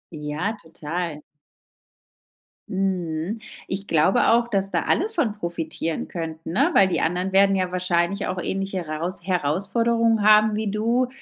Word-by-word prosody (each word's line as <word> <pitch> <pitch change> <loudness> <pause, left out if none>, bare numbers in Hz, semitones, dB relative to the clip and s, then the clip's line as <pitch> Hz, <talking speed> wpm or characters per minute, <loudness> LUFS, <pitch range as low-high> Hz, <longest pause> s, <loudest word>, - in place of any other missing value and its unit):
Ja, 155 +8 -3
total. 160 0 -5 1.5
Mhm. 185 -1 -2 0.3
Ich 195 +1 -4
glaube 160 +4 +3
auch, 235 +1 +4
dass 195 -3 -1
da - - 0
alle 405 +6 +1
von 240 - 0
profitieren 165 -2 -3
könnten, 165 -1 -6
ne, 280 - +3
weil 195 - +6
die 170 -3 0
anderen 180 +3 -1
werden 195 0 +5
ja 185 -1 -1
wahrscheinlich 180 +2 0
auch 185 - -3
ähnliche 195 0 -3
Heraus 165 +5 -4
Herausforderungen 205 +7 +1
haben 215 0 +6
wie 215 -2 -1
du. 235 +4 +1
190 Hz, 140 wpm, -23 LUFS, 170-215 Hz, 1.5 s, weil